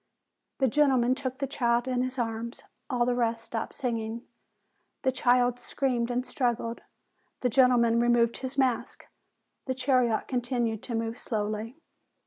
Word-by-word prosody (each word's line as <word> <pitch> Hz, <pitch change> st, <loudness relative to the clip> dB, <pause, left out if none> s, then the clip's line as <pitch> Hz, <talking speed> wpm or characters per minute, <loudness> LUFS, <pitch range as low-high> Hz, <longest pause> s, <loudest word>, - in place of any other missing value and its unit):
The 265 Hz, -, +3 dB
gentleman 260 Hz, -2 st, +3 dB
took 260 Hz, -1 st, -4 dB
the 275 Hz, -, -1 dB
child 240 Hz, -3 st, +1 dB
in 250 Hz, -1 st, 0 dB
his 255 Hz, +1 st, -3 dB
arms: 230 Hz, 0 st, -3 dB, 0.3 s
all 245 Hz, -1 st, +1 dB
the 250 Hz, -, +1 dB
rest 230 Hz, -1 st, 0 dB
stopped 225 Hz, -1 st, -4 dB
singing. 230 Hz, -2 st, -3 dB, 0.8 s
The 260 Hz, -, +3 dB
child 245 Hz, -1 st, +2 dB
screamed 245 Hz, -2 st, -1 dB
and 245 Hz, +1 st, 0 dB
strug 245 Hz, -4 st, 0 dB
gled. 230 Hz, 0 st, -5 dB, 0.6 s
The 250 Hz, -, +2 dB
gentleman 240 Hz, -2 st, +4 dB
removed 235 Hz, -1 st, +3 dB
*his 260 Hz, +1 st, -6 dB
mask. 260 Hz, -3 st, 0 dB, 0.6 s
The 260 Hz, -, -1 dB
chariot 250 Hz, -3 st, +2 dB
continued 245 Hz, -3 st, -1 dB
to 240 Hz, -, -4 dB
move 225 Hz, +1 st, -2 dB
slowly. 215 Hz, +3 st, -3 dB
245 Hz, 145 wpm, -28 LUFS, 230-255 Hz, 0.8 s, gentleman